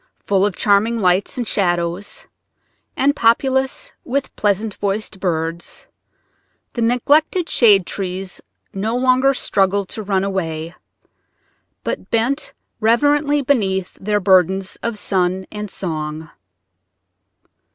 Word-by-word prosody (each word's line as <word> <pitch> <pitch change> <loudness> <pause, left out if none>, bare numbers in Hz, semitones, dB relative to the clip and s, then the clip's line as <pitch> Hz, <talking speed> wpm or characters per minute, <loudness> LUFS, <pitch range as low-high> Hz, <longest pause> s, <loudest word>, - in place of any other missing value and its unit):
Full 195 0 +3
of 195 - -4
charming 215 +3 +2
lights 185 +4 +1
and 240 -3 -2
shadows 175 - -1 0.7
and 285 +2 +3
populous 265 +3 +1
with 275 +2 -3
pleasant 210 +1 0
voiced 200 0 -3
birds, 165 -2 -3 0.9
the 235 - -3
neglected 290 +9 +2
shade 205 - +5
trees 190 0 -4 0.3
no 220 +5 -1
longer 260 +2 +3
struggled 195 -3 +1
to 220 - -5
run 195 -2 0
away, 165 -4 -3 1.1
but - - -4
bent 240 +6 0 0.3
reverently 290 +6 +2
beneath 195 -9 0
their 210 +1 +1
burdens 190 0 +2
of 235 -2 -3
sun 185 -2 0
and 210 -1 -5
song. 155 -4 -5
205 Hz, 110 wpm, -19 LUFS, 185-240 Hz, 1.1 s, shade